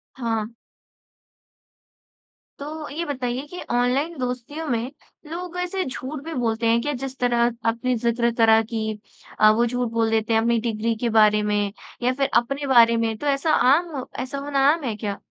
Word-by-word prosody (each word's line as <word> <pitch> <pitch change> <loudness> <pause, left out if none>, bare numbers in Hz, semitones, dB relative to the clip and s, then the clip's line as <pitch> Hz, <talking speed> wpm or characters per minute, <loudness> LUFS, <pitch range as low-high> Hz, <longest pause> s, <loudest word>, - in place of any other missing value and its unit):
हाँ। 225 -2 -3 2.0
तो 300 +1 -6
ये 320 +4 -4
बताइए 260 -2 -3
कि 360 +4 -8
ऑनलाइन 255 +7 +1
दोस्तियों 250 +5 -4
में 240 0 -1 0.4
लोग 350 +3 -6
ऐसे 370 +1 -2
झूठ 265 +2 -6
भी 325 0 -6
बोलते 230 -2 -1
हैं 230 +1 +4
क्या? 295 +3 -1
जिस 265 +1 -6
तरह 245 -1 +1 0.3
आपने 235 +3 0
ज़िक्र 235 +1 +1
करा 225 -1 +6
कि 220 -1 -4 0.4
अ, 215 0 +8
वो 230 +3 +3
झूठ 245 0 -1
बोल 225 -1 +1
देते 220 0 0
हैं 225 - +4
अपनी 235 +1 +2
डिग्री 225 0 -1
के 240 - 0
बारे 210 0 +5
में 210 0 +1 0.4
या 250 +1 +2
फ़िर 275 +1 0
अपने 275 +4 -4
बारे 235 -3 +6
में 225 -1 0
तो 295 - -6
ऐसा 285 +3 +1 0.2
आम 315 -5 -2 0.2
ऐसा 270 +2 -5
होना 280 0 -1
आम 325 -2 -4
है 235 -4 -2
क्या? 205 -1 -4
245 Hz, 175 wpm, -23 LUFS, 225-280 Hz, 2.0 s, अ